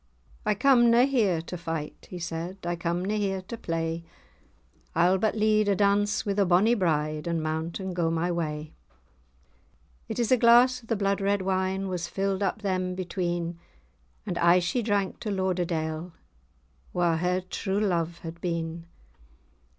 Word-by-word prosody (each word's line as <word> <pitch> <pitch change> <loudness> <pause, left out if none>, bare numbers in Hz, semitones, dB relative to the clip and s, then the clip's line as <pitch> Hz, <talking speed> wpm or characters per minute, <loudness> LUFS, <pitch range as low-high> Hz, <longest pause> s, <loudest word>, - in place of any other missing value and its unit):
"I 210 - +3
come 240 +1 +5
na 235 +2 +6
here 210 -12 +1
to 180 - -6
fight," 165 -3 -5
he 180 - -6
said, 170 +2 -5
"I 175 0 -1
come 170 +1 -2
na 205 - -1
here 195 -2 -1
to 210 - -7
play, 165 -5 -3 0.9
I'll 180 +3 +4
but 220 +2 +1
lead 215 -1 +3
a 200 - +3
dance 205 +1 +2
wi' 200 - 0
the 200 0 +2
bonny 190 +5 +4
bride, 155 -6 0
And 165 -2 -1
mount, 160 +3 -3
and 190 -2 -4
go 170 -2 +1
my 165 +2 0
way." 155 -2 -3 1.4
It - - -4
is 235 -1 0
a 255 - +6
glass 245 +2 +5
of 225 - -18
the 225 - +1
blood 200 -1 0
red 200 0 +1
wine 190 +1 0
Was 180 -2 -3
filled 195 +1 -1
up 205 +2 -1
them 185 -2 -1
between, 175 -2 -3 0.7
And 175 -2 -3
aye 170 +1 +6
she 180 +7 0
drank 205 -3 -1
to 220 - -4
Lauderdale, 175 -4 -2 0.8
Wha[#] 170 -2 +2
her 180 +2 +1
true 190 +2 -3
love 170 -5 0
had 170 0 -8
been. 165 -1 -3
185 Hz, 165 wpm, -27 LUFS, 170-200 Hz, 1.4 s, na